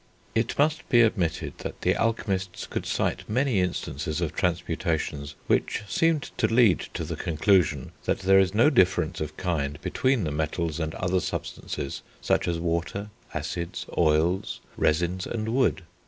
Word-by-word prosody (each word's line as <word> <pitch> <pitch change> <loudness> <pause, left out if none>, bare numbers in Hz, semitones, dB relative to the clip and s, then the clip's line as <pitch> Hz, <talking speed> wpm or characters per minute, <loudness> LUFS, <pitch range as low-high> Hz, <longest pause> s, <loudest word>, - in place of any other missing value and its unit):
It 115 +1 0
must 155 +2 +3
he 120 -2 +6
admitted 95 -8 0
that - - -6
the - - +3
alchemists 100 -5 -1
could - - -4
cite - - -1
many 125 -1 +2
instances 80 -3 -2
of 85 -3 -1
transmutations 80 -4 -1
which - - +1
seemed 155 - +1
to 110 - +3
lead 115 -5 +5 0.2
to - - -2
the - - -4
conclusion, 80 -4 +2
that - - 0
there 95 0 +6
is 95 +1 +2
no 120 +8 +5
difference 95 - +2
of 75 0 -4
kind 75 -6 -1
between 125 +5 +1
the 75 - -1
metals 80 +2 -2
and 80 -1 -2
other 90 +1 +1
substances 70 -4 -4 0.2
such - - +1
as 85 -1 0
water, 85 +5 -2 0.2
acids, 85 -1 -4
oils, 85 +4 +2 0.2
resins, 85 +4 +1
and 110 -1 -3
wood. 120 -5 +2
90 Hz, 155 wpm, -26 LUFS, 80-105 Hz, 0.2 s, he